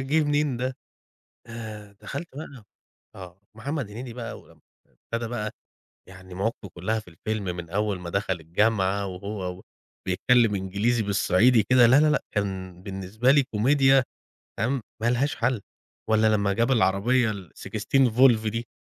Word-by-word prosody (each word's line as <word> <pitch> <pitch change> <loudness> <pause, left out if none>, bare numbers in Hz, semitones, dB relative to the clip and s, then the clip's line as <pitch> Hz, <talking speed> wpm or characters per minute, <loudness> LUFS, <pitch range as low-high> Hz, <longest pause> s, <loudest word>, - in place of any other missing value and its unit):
جه 145 +4 +2
منين 145 -2 +1
ده؟ 130 +1 -3 0.7
د 110 -3 -9
دخلت 155 +5 -6
بقى 140 -7 -9 0.5
آه. 90 -1 -11
محمد 130 0 -4
هنيدي 120 +3 -7
بقى 115 -1 -7
ولمّا - - -21 0.3
ابتدى 115 0 -6
بقى، 105 -3 -3 0.6
يعني 95 0 -12
مواقفه 100 +2 -3
كلها 110 +6 -1
في 105 - -17
الفيلم 105 +5 -4
من 85 -2 -7
أول 105 +1 -1
ما 85 -1 -6
دخل 100 +1 0
الجامعة، 100 +3 +1
وهو 95 -1 -5 0.4
وبيتكلم 115 +4 +3
إنجليزي 100 +5 0
بالصعيدي 105 +3 +3
كده، 125 0 +5
لا، 130 +5 +6
لا، 155 - +4
لأ. 150 - +1
كان 95 -3 -3
بالنسبة 100 +5 -1
لي 140 +1 +6
كوميديا 135 +3 +3 0.6
تمام؟ 125 +5 0 0.2
ما 115 - +2
لهاش 130 +3 +1
حل. 120 -2 0 0.5
والّا 110 0 +4
لمّا 100 -1 +1
جاب 115 +5 +1
العربية 115 +2 +2
valve 95 -5 -9
16 115 0 +3
دي. 115 +2 -4
110 Hz, 145 wpm, -25 LUFS, 100-125 Hz, 0.7 s, لا